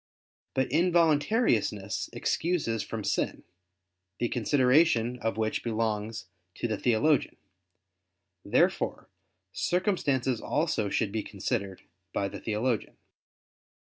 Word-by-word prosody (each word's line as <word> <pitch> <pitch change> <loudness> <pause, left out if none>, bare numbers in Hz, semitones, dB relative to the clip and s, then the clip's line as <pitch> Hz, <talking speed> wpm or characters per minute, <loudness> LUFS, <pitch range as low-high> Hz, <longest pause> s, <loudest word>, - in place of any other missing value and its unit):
But 130 -1 +2
involuntariness 155 - +2
excuses 155 -10 -1
from 110 -2 -5
sin, - - -1 0.7
the 120 - -1
consideration 125 -1 +3
of 115 -1 -2
which 110 -1 -1
belongs 110 -1 -2 0.3
to - - -2
the 110 - -1
theologian. 130 +5 +2 1.1
Therefore - - +1 0.4
circumstances 140 - 0
also 150 -10 0
should 100 - 0
be 110 +1 -1
considered 100 -1 -3 0.3
by 100 - 0
the - - -7
theologian. 110 +1 -2
120 Hz, 95 wpm, -28 LUFS, 110-150 Hz, 1.1 s, consideration